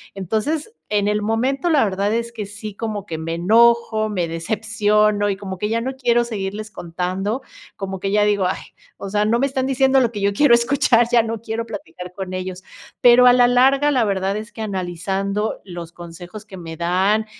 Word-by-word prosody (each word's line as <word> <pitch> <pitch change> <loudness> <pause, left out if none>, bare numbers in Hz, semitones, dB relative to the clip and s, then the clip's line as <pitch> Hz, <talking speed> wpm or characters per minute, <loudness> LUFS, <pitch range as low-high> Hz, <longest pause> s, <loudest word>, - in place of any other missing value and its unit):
entonces, 225 - -2 0.2
en 205 -1 0
el 210 0 0
momento 260 +9 0
la 295 -3 +4
verdad 200 0 0
es 235 0 -2
que 220 -3 -6
sí 205 +1 -8
como 210 -2 -4
que 160 - -4
me 160 +1 -4
enojo, 220 +4 +3
me 185 -5 -2
decepciono 210 +3 +1
y - - -2
como 190 -1 -7
que 210 - -2
ya 230 +2 -1
no 265 +2 -4
quiero 240 -2 +2
seguirles 215 -2 -5
contando, 185 +6 -3 0.3
como 190 -1 -5
que 195 +1 -2
ya 210 0 +3
digo: 205 -2 +2
"Ay, 185 - -1 0.4
o 200 - -7
sea, 210 +1 +1
no 230 +2 +2
me 275 - +2
están 265 -1 -2
diciendo 265 0 +3
lo 240 -2 +1
que 205 - -6
yo 200 0 +2
quiero 255 +4 +4
escuchar, 240 -1 +3
ya 235 -1 +5
no 225 -1 -4
quiero 225 0 -4
platicar 180 -4 -9
con 190 -1 -6
ellos", 185 0 -5 0.4
pero 245 +1 +7
a 250 - +8
la 245 0 +5
larga 270 +4 +4
la 260 -5 +2
verdad 195 0 -1
es 215 +2 -7
que 225 - -9
analizando 195 +2 -2
los 175 -3 -8
consejos 175 +4 -10
que 195 -3 -11
me 165 -2 -8
dan 190 +6 +1
210 Hz, 205 wpm, -20 LUFS, 190-235 Hz, 0.4 s, a